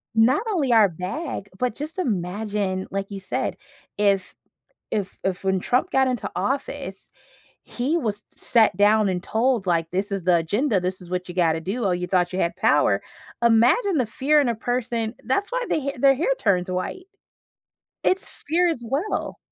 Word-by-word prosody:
Not 240 - +4
only 295 -10 +1
our 215 -3 +6
bag, 195 - -5
but 250 -3 0
just 310 +5 -6
imagine, 200 - -2
like 195 0 -2
you 200 - -5
said, 195 - -2 0.4
if 200 -2 +2 0.6
if 200 -2 -3
if 190 -1 -2
when 190 -1 +1
Trump 255 - 0
got 265 -4 +3
into 250 -3 -2
office, 265 0 -3 0.5
he 265 +7 -1
was 210 -9 -2
sat 225 -7 +3
down 210 +1 +4
and 180 -2 -1
told, 230 -1 +1
like, 165 -2 +1
this 195 +3 -1
is 195 -3 -3
the 180 -1 +4
agenda. 205 - +1
This 180 +1 -3
is 175 -1 -12
what 180 0 -3
you 175 - -7
gotta 165 -3 +2
do. 205 +7 -3
Oh, 185 - +2
you 180 0 -2
thought 180 -1 +1
you 185 - -1
had 170 - 0
power. - - +3 0.4
Imagine 245 - +4
the 250 - +1
fear 295 +6 +2
in 275 - +1
a 235 - +1
person 235 -1 -2
that's 330 - -1
why - - 0
they - - +2
hair 280 0 -2
their 270 +2 +5
hair 325 - 0
turns 180 -2 +2
white. 185 - -4 1.0
It's 370 - +1 0.2
fear 345 +4 +3
as 320 -8 -2
well. 285 - -2
220 Hz, 180 wpm, -24 LUFS, 185-265 Hz, 1.0 s, our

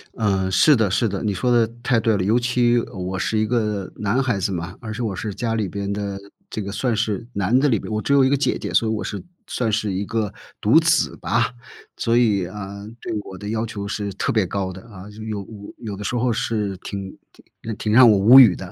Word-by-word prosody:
嗯， 95 -3 0
是 145 +10 +5
的 110 -5 +1
是 115 +2 +1
的。 100 +3 -4
你 105 -2 0
说 125 +6 0
得， 120 -2 +4 0.2
太 120 -2 +2
对 110 -1 +2
了。 95 - 0
尤 110 +5 +3
其， 120 -1 +2
呃， 115 - -3
我 95 0 -4
是 110 - -1
一 110 - +1
个 105 -5 -1
男 105 +6 0
孩 125 -6 0
子 95 - -1
嘛， 85 0 -5
而 110 -2 -6
且 120 - -5
我 105 -5 -2
是 105 0 -4
家 115 +1 -2
里 105 -3 -1
边 100 +2 -4
的 100 -1 -3 0.3
这 110 - -3
个 100 0 -5
算 115 +3 -1
是 110 0 -1
男 100 +5 +2
的 145 - +3
里 115 -7 +2
边 - - -8
我 110 - 0
只 140 - 0
有 140 - +6
一 130 - +3
个 140 - +2
姐 140 - +1
姐， - - -5
所 115 - +3
以 - - 0
我 110 - -2
是 100 - -5 0.2
算 115 -3 -1
是 105 -1 0
一 95 +2 -2
个 110 -1 -2 0.3
独 - - +6
子 - - +1
吧。 - - 0 0.5
所 115 0 +1
以， 105 -6 +3
呃， 100 +2 -8
对 - - -5
我 95 - -10
的 105 0 -6
要 110 +1 -1
求 100 -2 -6
是 100 -2 -3
特 - - -1
别 110 -4 +2
高 95 0 -3
的 95 +1 -11
啊。 100 -2 -11
就， 105 +1 -13
有 105 -2 -4 0.4
有 110 -4 -6
的 105 - -6
时 120 - -2
候 120 0 +1
是 105 -3 -2
挺 95 +1 -7 0.5
挺 110 -1 -4
挺 105 - -2
让 125 +2 +8
我 - - +5
无 110 +7 +8
语 110 -9 +8
的。 90 -2 -8
105 Hz, 275 characters per minute, -22 LUFS, 100-115 Hz, 0.5 s, 让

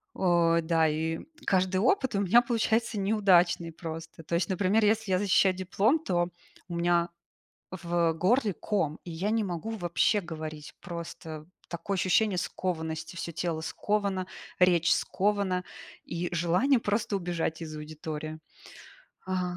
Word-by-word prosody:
Э, 170 -2 +3
да. 165 -1 +2
И 160 +1 -1 0.3
каждый 185 0 +2
опыт 255 - +2
у 200 - +1
меня 205 +5 +5
получается 230 -1 0
неудачный 190 -5 +3
просто. 165 0 -8
То 170 - -2
есть, 170 0 0
например, 200 +3 +2
если 220 0 +2
я 185 - +4
защищаю 190 -1 +3
диплом, 195 - +2
то 175 - 0 0.4
у 175 - -5
меня 170 0 +2 0.6
в 170 -2 0
горле 210 +6 +2
ком, 170 -5 -1
и 175 - -7
я 185 +6 -1
не 225 -1 +1
могу 180 +3 -4
вообще 190 0 +1
говорить 155 -4 -7
просто. 165 -3 -7 0.2
Такое 185 +3 -3
ощущение 190 +1 +2
скованности, 160 -3 -3
всё 170 - -4
тело 165 0 -2
сковано, 195 +2 -1 0.3
речь 175 -2 +4
скована, 195 -2 0 0.4
и 170 +1 -3
желание 175 +11 +3
просто 210 0 -1
убежать 175 -3 -2
из 155 -2 -6
аудитории. 155 0 -6 0.9
А. 180 -1 -2
180 Hz, 140 wpm, -28 LUFS, 165-200 Hz, 0.9 s, меня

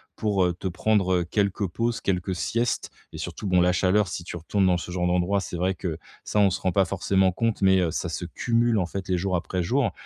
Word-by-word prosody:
pour, 100 -4 +1
heu, 90 - +1
te 90 +2 -5
prendre, 95 +1 +1
heu, - - -1
quelques 100 +2 0
pauses, 115 +6 -2
quelques 95 -2 -1
siestes. 115 +7 -1 0.2
Et - - -9
surtout 105 - -5
bon, 90 -1 +3
la 90 +1 +4
chaleur 95 +3 +2
si 90 -1 -5
tu 90 - -7
retournes 95 +4 +1
dans 90 -1 +3
ce 90 - -7
genre 90 0 0
d'endroit, 90 +3 +1
c'est 90 - -6
vrai 90 +2 +1
que 90 -4 -4 0.3
ça 105 - -1
on 100 -2 +5
se 90 - -3
rend 95 - +1
pas 95 +2 +3
forcément 95 +1 +1
compte, 110 +2 -1
mais 95 0 +5
heu, 90 -2 +1
ça 85 - -3
se 85 +1 -4
cumule 115 +5 +1
en 95 - +1
fait 95 +2 -6
les 90 - +2
jours 95 +1 -1
après 90 +1 -2
jours. 125 +8 +1
95 Hz, 250 wpm, -25 LUFS, 90-100 Hz, 0.3 s, on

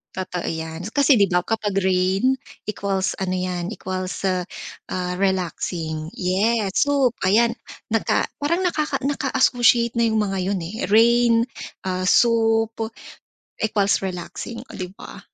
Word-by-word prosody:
Totoo 180 -2 -4
yan. 160 +1 -4
Kasi 280 0 +4
'di 200 -3 +3
ba 180 - +4
kapag 215 +1 -2
rain? 190 +6 +2 0.3
Equals 195 -2 -1
ano 190 -1 -3
yan, 180 -1 -2
equals, 185 +1 -4
ah, 180 0 -4
relaxing, 175 -4 -2
yes, 195 +3 +1
soup. 275 -4 +2
Ayan, 225 +5 +3 0.3
naka - - +1
parang 325 +5 0
nakaka 305 -6 0
naka-associate 245 -4 +2
na 235 - +2
yung 220 - +2
mga 195 -2 -1
yun, 195 - -1
eh, 210 +5 -7
rain, 235 +2 +5 0.5
ah, 185 0 -1
soup 225 +1 +2 0.7
equals 205 -2 +2
relaxing, 190 +5 -6
oh - - -14
'di 185 -2 -4
ba? - - -10
200 Hz, 130 wpm, -22 LUFS, 185-235 Hz, 0.7 s, rain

